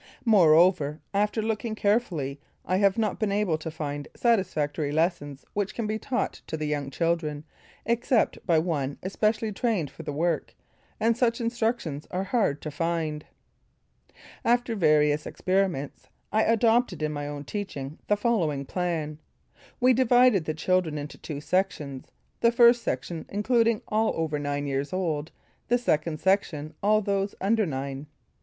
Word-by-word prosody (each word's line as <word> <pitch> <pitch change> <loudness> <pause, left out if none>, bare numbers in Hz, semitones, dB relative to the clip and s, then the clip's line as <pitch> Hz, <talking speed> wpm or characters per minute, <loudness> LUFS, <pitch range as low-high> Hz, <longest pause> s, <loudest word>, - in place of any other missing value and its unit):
Moreover 170 -6 +5
after 210 +2 +1
looking 220 0 -2
carefully, 175 - 0 0.2
I 185 - +1
have 200 0 +3
not 215 -3 0
been 215 -2 0
able 200 -6 +1
to 160 - -5
find 145 -2 -5
satisfactory 155 - 0
lessons 150 -3 -1
which 200 -2 -2
can 230 - -2
be 215 +1 -2
taught 250 -4 -2
to 160 - -3
the 155 - -3
young 145 -2 -2
children 160 -1 -1 0.4
except 235 +1 +1
by 170 -3 +4
one 150 -4 -1
especially 215 +3 0
trained 200 - -1
for 160 - -10
the 155 -2 -5
work; 165 +2 -1 0.4
and 230 +1 +3
such 235 -1 +1
instructions 230 - -2
are 185 +1 -2
hard 195 - 0
to 155 - -4
find. 160 -1 -2 1.2
After 240 0 +2
various 150 -4 +3
experiments 185 -7 -1 0.3
I 220 +1 +3
adopted 225 -5 +2
in 155 - 0
my 145 -1 -4
own 145 -1 -5
teaching 150 -6 -5
the 210 - +2
following 170 -11 0
plan. 160 -2 -2 0.6
We 255 +1 +5
divided 245 -6 +4
the 155 - -2
children 170 -1 +1
into 145 0 -7
two 145 -3 -6
sections; 150 -7 -1 0.3
the 235 - +4
First 240 0 +6
Section 145 - -4
including 230 +1 +2
all 220 +1 +1
over 155 -2 -1
nine 145 0 -2
years 140 +3 -2
old, 160 -4 -2 0.4
the 245 - +3
Second 155 -9 0
Section 160 -6 0
all 215 +1 +3
those 200 0 -1
under 215 +1 +2
nine. 135 0 -4
180 Hz, 150 wpm, -27 LUFS, 150-215 Hz, 1.2 s, First